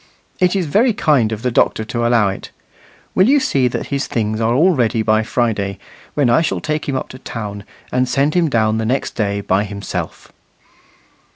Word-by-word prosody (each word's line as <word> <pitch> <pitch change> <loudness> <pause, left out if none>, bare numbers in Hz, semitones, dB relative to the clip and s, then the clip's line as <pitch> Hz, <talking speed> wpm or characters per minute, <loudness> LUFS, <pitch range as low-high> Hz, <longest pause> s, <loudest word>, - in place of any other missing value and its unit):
It 180 +1 +2
is 190 -3 0
very 220 - +3
kind 140 - +2
of 110 +1 -5
the 125 - 0
doctor 110 -1 +1
to 120 0 -1
allow 115 -4 +3
it. 95 - -7 0.6
Will 190 +6 +4
you 290 +1 +5
see 135 - +1
that 120 - -4
his 140 - -1
things 110 -1 -2
are 115 +2 +2
all 170 +8 +5
ready 115 -3 +1
by 110 0 +3
Friday, 110 -4 -1 0.4
when 145 -3 +2
I 120 +5 +4
shall 165 - -1
take 155 -1 -3
him 135 - -1
up 130 - -3
to 130 - -10
town, 105 -5 -6 0.3
and 125 0 +1
send 140 +4 +1
him 175 -3 +2
down 110 -3 +1
the 110 - -1
next 130 +4 -1
day 100 -2 -2
by 95 +1 +1
himself." 100 -1 -6
120 Hz, 200 wpm, -18 LUFS, 110-145 Hz, 0.6 s, you